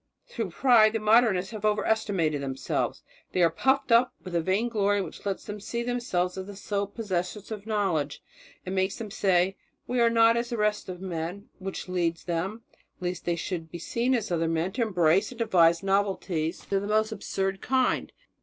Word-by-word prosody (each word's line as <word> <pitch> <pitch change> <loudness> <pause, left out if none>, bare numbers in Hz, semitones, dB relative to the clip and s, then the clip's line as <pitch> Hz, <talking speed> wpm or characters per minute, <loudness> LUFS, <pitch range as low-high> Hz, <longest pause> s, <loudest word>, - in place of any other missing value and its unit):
Through 225 -5 -4
pride 225 +2 +5
the 225 - 0
Modernists 215 -3 +3
have 215 -2 -7
overestimated 205 -8 +1
themselves. 135 -1 -2 0.3
They 180 - +3
are 165 - +4
puffed 265 +8 +1
up 235 +2 +5
with 185 -1 -8
a 170 - +2
vainglory 205 +2 +1
which 195 - -6
lets 195 - -3
them 210 0 -6
see 235 +3 -3
themselves 215 -7 -1
as 190 - -6
the 205 - -8
sole 200 0 -2
possessors 200 -1 -4
of 210 -1 -6
knowledge, 180 -10 0 0.5
and 185 - -4
makes 190 +1 0
them 215 -3 -7
say, 190 -2 +2 0.3
'We 250 0 -1
are 235 -1 +5
not 230 0 +5
as 235 0 -1
the 235 - -3
rest 210 -2 0
of 180 0 -7
men'; 180 +2 -5
which 190 0 -5
leads 170 -2 -1
them, 185 +6 -3 0.4
lest 180 -1 -4
they 175 - +1
should 165 -1 -4
seem 240 +9 0
as 220 -5 -2
other 165 -1 +1
men, 165 +3 0
to 245 - -3
embrace 180 -4 +2
and 250 - -10
to 230 - 0
devise 170 -4 +4
novelties 195 -4 0
of - - -22
the 200 - -4
most 215 +1 +2
absurd 195 -3 -2
kind. 260 -1 +1
195 Hz, 190 wpm, -27 LUFS, 180-220 Hz, 0.5 s, pride